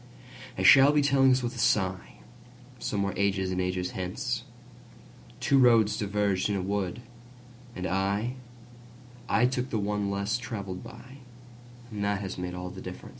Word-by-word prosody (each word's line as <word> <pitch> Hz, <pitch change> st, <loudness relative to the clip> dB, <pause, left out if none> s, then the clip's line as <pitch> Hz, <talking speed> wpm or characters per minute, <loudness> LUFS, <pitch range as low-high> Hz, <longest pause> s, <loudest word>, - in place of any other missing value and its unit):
I -, -, -1 dB
shall 140 Hz, +1 st, +8 dB
be 150 Hz, 0 st, +3 dB
telling 135 Hz, -1 st, +4 dB
this 130 Hz, 0 st, +3 dB
with 120 Hz, 0 st, -3 dB
a 95 Hz, -4 st, +2 dB, 0.8 s
sighSomewhere 100 Hz, +11 st, -2 dB
ages 95 Hz, -2 st, 0 dB
and 90 Hz, 0 st, -1 dB
ages 90 Hz, 0 st, -2 dB
hence:Two 120 Hz, +6 st, -4 dB
roads 115 Hz, -4 st, +5 dB
diverged 100 Hz, -2 st, 0 dB
in 100 Hz, -, 0 dB
a 95 Hz, -, -1 dB
wood, 100 Hz, +3 st, -3 dB, 0.7 s
and 90 Hz, -, -4 dB
I—I 120 Hz, +5 st, -3 dB
took 125 Hz, 0 st, -1 dB
the 115 Hz, -, -1 dB
one 105 Hz, -1 st, -1 dB
less 100 Hz, +4 st, -1 dB
traveled 100 Hz, -7 st, -6 dB
by, 130 Hz, +2 st, -12 dB, 0.7 s
And 105 Hz, -1 st, -4 dB
that 100 Hz, -1 st, 0 dB
has 95 Hz, -2 st, -5 dB
made 90 Hz, 0 st, -4 dB
all 90 Hz, 0 st, -6 dB
the -, -, -9 dB
difference. -, -, -9 dB
105 Hz, 145 wpm, -28 LUFS, 95-125 Hz, 0.8 s, shall